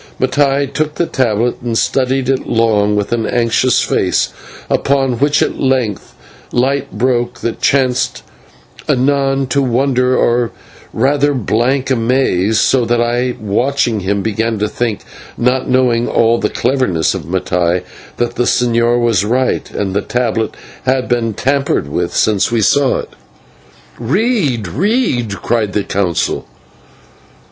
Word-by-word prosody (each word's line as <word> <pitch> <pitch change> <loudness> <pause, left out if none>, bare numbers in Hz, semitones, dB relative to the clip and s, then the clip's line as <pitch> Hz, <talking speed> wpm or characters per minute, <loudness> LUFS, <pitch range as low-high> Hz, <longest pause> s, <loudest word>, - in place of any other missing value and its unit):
Now - - +2
Mattai 140 0 +1
took 155 0 -1
the 170 - 0
tablet 120 -4 0
and 115 -2 -2
studied 130 +1 0
it 135 0 0
long 105 -2 +2
with 105 -1 -2
an 115 -2 -1
anxious 120 +1 +2
face, - - 0 0.4
upon 135 -3 0
which 145 +1 +3
at - - -3
length 130 -7 -1 0.4
light 135 +3 0
broke 120 +1 -1
that 115 - -3
changed 130 -2 +1 0.7
anon 135 +1 +1
to 140 - +1
wonder, 125 0 +1
or 120 0 +2 0.4
rather 140 +4 +1
blank 130 +4 0
amaze, 115 -5 +1
so 130 -2 +3
that 120 +1 +1
I, 120 +1 0
watching 120 +2 0
him, 100 +1 -1
began 110 +1 -1
to 105 +1 0
think, 115 -2 -2 0.4
not 125 +2 0
knowing 125 -2 +2
all 115 0 +2
the - - 0
cleverness 120 -11 0
of 95 -6 -5
Mattai, 90 0 0 0.3
that 120 - -1
the 125 - +1
señor 120 0 +2
was 115 -5 +2
right, 125 +4 0
and 95 -2 -3
the 100 - +1
tablet 115 -1 -2 0.3
had 130 0 +1
been 115 -3 -1
tampered 135 - 0
with 85 +4 -2
since 105 0 +2
we 115 -2 +1
saw 135 +5 +3
it. - - -12 0.9
"Read! 145 - 0
Read!" 125 - -1
cried 110 -4 0
the 105 - 0
Council. 95 -5 -1
120 Hz, 140 wpm, -15 LUFS, 110-135 Hz, 0.9 s, which